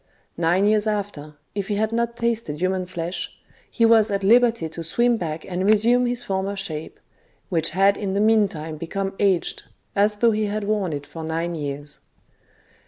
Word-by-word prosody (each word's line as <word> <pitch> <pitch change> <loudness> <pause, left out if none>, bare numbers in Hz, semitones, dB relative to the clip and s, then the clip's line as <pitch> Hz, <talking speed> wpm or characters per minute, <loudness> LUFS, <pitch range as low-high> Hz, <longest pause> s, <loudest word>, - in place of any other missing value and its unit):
Nine 175 +4 +2
years 210 0 +2
after, 200 -8 -3 0.2
if 200 -1 -3
he 210 - -1
had' 215 +2 0
not 235 0 -1
tasted 230 -11 -1
human 185 0 0
flesh, 175 0 -4 0.3
he 230 - +2
was 225 -1 +5
at 200 -1 -1
liberty 230 -2 +4
to 160 +1 -8
swim 235 +9 +2
back 160 -6 -4
and 185 0 -3
resume 235 +4 +4
his 245 0 -1
former 195 +1 -2
shape, 160 -5 -5 0.5
which 165 -3 +1
had 195 +3 +3
in 195 -2 -3
the - - +1
meantime 200 -8 +1
become 195 +5 -3
aged, 195 -4 +1 0.3
as 210 +1 +3
though 230 +2 +3
he 215 0 0
had 210 +1 -2
worn 205 -4 0
it 145 -1 -5
for 160 +3 -8
nine 165 +2 -2
years. 145 -2 -5
195 Hz, 175 wpm, -23 LUFS, 165-215 Hz, 0.5 s, was